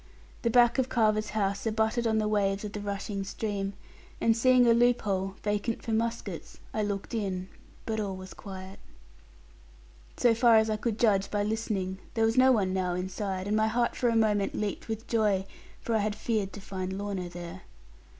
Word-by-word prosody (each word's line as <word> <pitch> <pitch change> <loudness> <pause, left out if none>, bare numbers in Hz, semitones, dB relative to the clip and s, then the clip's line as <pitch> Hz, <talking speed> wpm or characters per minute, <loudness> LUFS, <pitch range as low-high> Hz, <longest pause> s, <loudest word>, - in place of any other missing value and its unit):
The 235 - +1
back 240 +2 +5
of 260 0 +1
Carver's 215 -3 +2
house 200 +1 0
abutted 220 +2 +1
on 220 -1 +2
the 215 -1 +1
waves 200 -1 +1
of 205 - -5
the 210 - -4
rushing 200 0 -3
stream; 200 -1 -3 0.5
and 225 -1 +3
seeing 255 +1 +5
a 235 - +6
loop 240 +1 +3
hole, 195 -1 -1
vacant 210 +2 -1
for 230 - -3
muskets, 225 -5 -3
I 215 - 0
looked 200 0 -3
in, 190 -4 -2 0.4
but 220 -1 -2
all 200 -2 -2
was 185 0 -9
quiet. 190 -1 -9 1.4
So 240 -2 +4
far 230 0 +5
as 220 0 +4
I - - +1
could 215 0 -2
judge 200 -4 +3
by 205 -1 0
listening, 205 -3 -2 0.2
there 225 -1 +3
was 225 +1 +1
no 260 0 +6
one 195 -6 +2
now 180 -2 0
inside, 190 +1 -3
and 210 - +1
my 220 0 +3
heart 235 +2 +1
for 245 - +1
a 230 - +1
moment 210 -3 +2
leaped 210 -2 -3
with 225 0 -4
joy, 210 -4 +2 0.4
for 230 - -2
I 220 - +3
had 205 0 -1
feared 215 -5 -1
to 205 - -8
find 190 -1 -4
Lorna 195 -3 -3
there. 175 +1 -8
210 Hz, 195 wpm, -29 LUFS, 195-225 Hz, 1.4 s, a